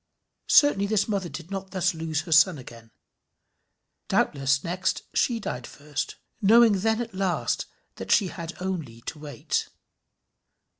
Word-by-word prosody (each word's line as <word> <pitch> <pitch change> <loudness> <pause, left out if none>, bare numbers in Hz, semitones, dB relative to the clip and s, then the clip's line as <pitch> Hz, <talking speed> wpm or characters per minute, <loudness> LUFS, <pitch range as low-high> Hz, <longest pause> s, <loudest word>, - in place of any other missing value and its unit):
Certainly 200 -9 +5
this 205 -1 +1
mother 195 -5 -2
did 170 +3 -9
not 195 -1 -5
thus 185 0 0
lose 160 -1 -2
her 165 +1 -10
son 160 +2 +6
again. 115 -3 -12 1.2
Doubtless 140 0 +1
next 180 +2 -1
she 235 -2 +2
died 125 - -5
first, 145 0 -5 0.3
knowing 220 0 +6
then 220 +3 +1
at 230 - -11
last 190 -2 -1 0.3
that - - -7
she 195 -4 +4
had 170 -1 -8
only 165 -11 -4
to 150 - -7
wait. 145 -6 -3
180 Hz, 140 wpm, -26 LUFS, 150-200 Hz, 1.2 s, son